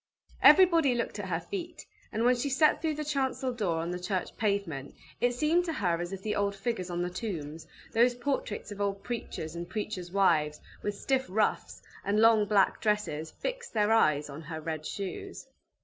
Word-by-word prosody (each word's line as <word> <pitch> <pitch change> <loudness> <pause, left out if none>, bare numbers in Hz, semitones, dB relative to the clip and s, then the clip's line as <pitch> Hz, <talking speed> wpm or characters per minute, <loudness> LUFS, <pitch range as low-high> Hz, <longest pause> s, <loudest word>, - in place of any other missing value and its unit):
Everybody 335 -8 +7
looked 235 -2 -2
at 190 -2 -5
her 165 -2 0
feet; 345 - -6 0.3
and 225 +2 0
when 250 +1 +5
she 245 +4 -2
stepped 300 +3 +3
through 315 -2 0
the 305 0 -4
chancel 265 -3 -1
door 200 -8 -1
on 165 +2 -2
the 180 - -3
church 185 0 -3
pavement, 200 -10 -2 0.2
it 245 0 +2
seemed 315 +7 +2
to 330 - -2
her 175 - 0
as 175 +1 -4
if 195 0 -6
the 215 - -1
old 200 0 0
figures 195 -3 -3
on 175 0 -1
the 180 - -2
tombs, 165 -6 -5 0.2
those 240 +2 +4
portraits 245 -5 -3
of 205 0 -6
old 200 -1 -1
preachers 220 -9 -5
and 170 0 -6
preachers' 185 -3 -4
wives, 160 -6 +2 0.2
with 205 0 -2
stiff 265 -1 0
ruffs, 210 +3 0 0.2
and 205 +2 +1
long 225 -1 +6
black 200 -2 +3
dresses, 210 -8 0
fixed - - -6
their 210 0 +3
eyes 150 -10 +3
on 145 +2 -8
her 160 0 -6
red 155 -1 -4
shoes. 195 -2 -6
205 Hz, 195 wpm, -29 LUFS, 175-245 Hz, 0.3 s, Everybody